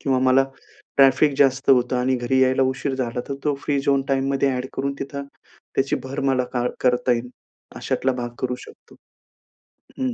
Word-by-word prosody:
किंवा 135 -2 +1
मला 135 +1 +5 0.5
ट्रॅफिक 135 +2 +5
जास्त 135 -1 +3
होतं 125 -1 +3
आणि 130 +1 +1
घरी 125 +2 +1
यायला 130 +1 +3
उशीर 130 +1 -3
झाला 125 -2 -2
तर 140 - -2
तो 150 -2 +2
फ्री 140 -1 0
झोन 140 0 +2
टाईममध्ये 135 0 +1
एड 125 +1 -3
करून 140 +1 -1
तिथं, 140 0 -5 0.5
त्याची 135 +1 +1
भर 135 +2 -4
मला 130 -1 +1 0.4
करता 125 0 +2
येईल 120 +1 -2 0.5
अशातला 130 0 -1
भाग 120 -1 -4
करू 125 -1 -1
शकतो - - -17 1.1
हं. 260 -1 -1
135 Hz, 165 wpm, -22 LUFS, 125-140 Hz, 1.1 s, मला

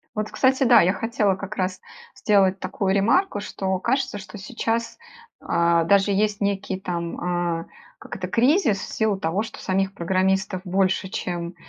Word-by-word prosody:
Вот, 215 0 -3
кстати, 265 +1 +2
да, 240 -1 +7
я 185 +3 +3
хотела 215 -4 0
как 200 +1 -7
раз 185 -1 -2 0.4
сделать 195 -2 +2
такую 195 -1 -1
ремарку, 225 - +2
что 190 -2 -2
кажется, 260 -1 -1
что 195 +2 -10
сейчас, 230 +2 -3 0.4
а, 170 0 +2
даже 200 +3 +3
есть 205 +1 0
некий 195 -1 -1
там, 175 -1 -2
э, - - -11 0.3
как - - -9
это, 185 -2 -4
кризис 240 - +2
в - - -7
силу 215 -3 0
того, 180 +6 -1
что - - -9
самих 195 +1 0
программистов 190 +1 0
больше, 190 0 0
чем 175 -2 -4
195 Hz, 160 wpm, -23 LUFS, 185-215 Hz, 0.4 s, да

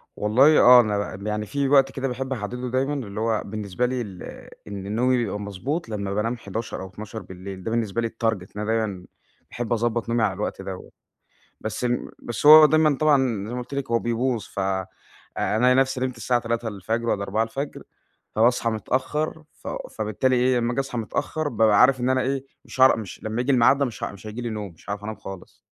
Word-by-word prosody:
والله 130 +9 +5
آه 125 0 +9
أنا 105 -3 -2
ال 100 +2 -7
يعني 105 0 -2
في 140 +7 -1
وقت 135 -1 +5
كده 135 0 -3
باحب 130 +1 -3
احدده 125 +2 -4
دايمًا 130 +3 0
اللي 110 -7 -5
هو 110 -1 +1
بالنسبة 105 +2 -2
لي 125 0 -1
ال 95 -6 -8 0.4
إن 100 0 -5
نومي 125 +2 +3
يبقى 105 -4 -1
مضبوط 115 - -4
لمّا 100 -2 -3
بانام 115 +4 -1
23:00 110 0 -5
أو 95 - -6
00:00، 95 -2 -8
ده 110 - -3
بالنسبة 115 -1 0
لي 115 - 0
الtarget 115 0 0 0.2
إن 105 - -4
أنا - - -2
دايمًا 110 -5 -1 0.4
باحب 120 -1 -3
اضبط 120 0 -1
نومي 115 -1 +1
على 100 -3 +2
الوقت 105 0 -4
دَوّة. 95 -1 -8 0.7
بس 110 +2 -4
م 120 0 -1
بس 120 +4 -4
هو 155 +1 +11
دايمًا 155 -1 +3
طبعًا 135 -9 +2
زي 120 - -5
ما 125 - -3
قُلت 125 +3 -8
لِك 140 -3 -3
هو 115 - +3
بيبوظ 120 0 -1
ف - - -11 0.8
ألاقي 125 +4 +3
نفسي 130 0 +2
نمت 130 -1 -2
الساعة 120 +1 +1
03:00 115 -1 -2
والّا 100 - 0
04:00 115 +8 -2 0.5
فباصحى 115 +1 +3
متأخر 140 +8 -2
فو - - -7
فبالتالي 110 +4 0
إيه، 125 0 +3
لمّا 120 0 0
آجي 130 - 0
اصحى 135 -3 -4
متأخر 150 +7 -2
بابقى 110 -4 +3
عارف 130 0 +5
إن 125 +1 +1
أنا 130 0 +2
إيه، 135 +1 -1 0.2
مش - - -8
هاعر 130 0 +7
مش 105 -5 -8
لمّا 110 +2 -2
ييجي 130 +3 +1
الميعاد 130 +2 +5
ده 140 - +2
مش 120 -4 -4
ه - - -4
مش 100 +1 -12
هييجي 110 +3 -6
لي 120 -1 -3
نوم، 105 -4 -5
مش 80 - -22
هاعرف 105 0 -4
أنام 110 0 -5
خالص. 95 -1 -10
115 Hz, 210 wpm, -24 LUFS, 105-130 Hz, 0.8 s, هو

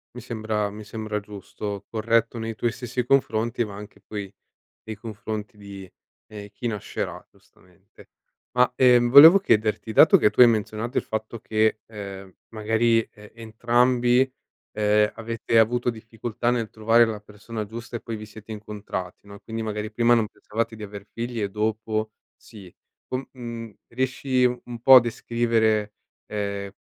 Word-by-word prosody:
Mi 125 - -8
sembra 110 -3 -2
mi 105 +1 -10
sembra 110 0 -4
giusto, 100 0 -7
corretto 115 +1 0
nei 115 0 -4
tuoi 120 +1 -1
stessi 125 0 -4
confronti, 120 -3 +1
ma 100 - -9
anche, 105 +1 -11
poi, 100 -2 -7 0.5
nei 110 - -6
confronti 105 -1 -7
di, 100 -2 -11 0.4
ehm, 105 -1 -9
chi 120 +3 -4
nascerà 105 -3 -5
giustamente. 90 +1 -23 0.4
Ma, 125 0 +3
ehm, 125 -2 +5
volevo 160 +9 +10
chiederti: 110 - +1
dato - - +7
che 105 - +4
tu - - -1
hai 125 - +11
menzionato 110 +1 -1
il - - +2
fatto 110 +1 -5
che, 110 -1 +1
ehm, 100 -3 -9 0.2
magari, 115 +1 +2
e 105 -1 -17
entrambi, 120 +3 +2 0.4
ehm, 105 0 +2
avete 115 0 -1
avuto 120 +2 +2
difficoltà 115 +1 -4
nel 115 -3 -2
trovare 115 +2 +4
la 110 -2 -3
persona 105 +1 -7
giusta 115 +3 -7
e - - -6
poi 115 - -6
vi 110 0 -7
siete 110 +1 -11
incontrati, 105 -3 -7
no, 100 - -12
e 100 - -13
quindi, 115 0 -5
magari, 105 0 -4
prima 120 0 +3
non 115 -2 +1
pensavate 115 +2 -4
di 110 - -7
aver 100 -1 -9
figli, 120 0 -4
e 100 - -2
dopo, 110 +1 -2 0.2
sì, 95 -5 -14 0.4
co 130 +1 -4
mhmm, 115 -3 -8
riesci 130 +1 0
un 125 0 +1
un 120 -1 -8
po' 135 - +8
a - - +10
descrivere, 115 -2 0 0.3
ehm, 100 -1 -4
110 Hz, 160 wpm, -24 LUFS, 105-120 Hz, 0.5 s, hai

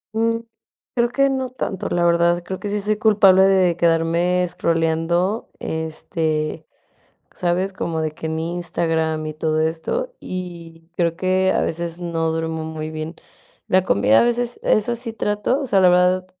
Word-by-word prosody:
Mm, 230 +1 +1 0.5
creo 235 -1 +2
que 275 +2 +2
no 265 -1 -2
tanto, 200 -6 -4
la 175 0 +1
verdad, 170 0 +3
creo 190 +1 -5
que 205 - -4
sí 205 +1 -1
soy 210 +1 0
culpable 200 -4 +5
de 190 -3 +4
quedarme 170 +2 +2
escrolleando, 170 +3 0
este, 160 -1 -3 0.7
¿sabes?, 180 +2 -1
como 165 -3 -3
de 155 -1 -1
que 160 - -6
en 160 0 -2
Instagram 165 -2 -1
y 155 - -4
todo 155 0 -1
esto. 320 - -2
Y 170 -3 -7
creo 170 -1 0
que 185 0 +2
a - - +2
veces 170 +1 -3
no 165 -2 -1
duermo 160 0 -3
muy 155 0 -5
bien. 155 +1 -5 0.5
La 185 0 +3
comida 105 - +4
a - - +4
veces, 240 0 0
eso 215 +3 +2
sí 235 -1 -4
trato 210 +4 -1
o 280 - -3
sea, 195 -6 +3
la 180 - +6
verdad, 180 +1 +3
175 Hz, 165 wpm, -21 LUFS, 160-195 Hz, 0.7 s, la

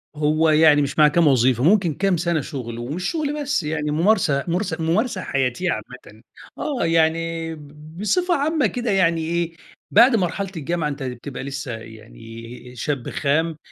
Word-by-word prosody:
هو 155 +2 +2
يعني 155 -1 +5
مش 140 +2 -2
مع 150 - +8
كام 165 +2 +3
وظيفة 130 -2 +3
ممكن 180 -1 +3
كام 190 +2 +1
سنة 170 -1 0
شغل، 125 -6 -6
ومش 150 +10 -3
شغل 300 -2 -2
بس 285 - -1
يعني 150 -1 -2
ممارسة 160 -4 +2
ممارس 180 +1 -1
ممارسة 185 +6 0
حياتية 135 +5 -1
عامةً، 110 -1 -8 0.4
آه 280 - -2
يعني 165 0 0
ب 150 +2 -14
بصفة 350 - +1
عامة 300 -2 +1
كده 240 +3 -2
يعني 170 -4 +2
إيه، 170 +1 -2 0.4
بعد 245 0 +6
مرحلة 195 -1 -1
الجامعة 160 +1 -2
أنت 140 -1 -5
بتبقى 130 +1 -6
لسه 140 -1 -5
يعني 115 - -12
شاب 130 +1 -3
خام 160 +3 0
160 Hz, 155 wpm, -22 LUFS, 140-185 Hz, 0.4 s, مع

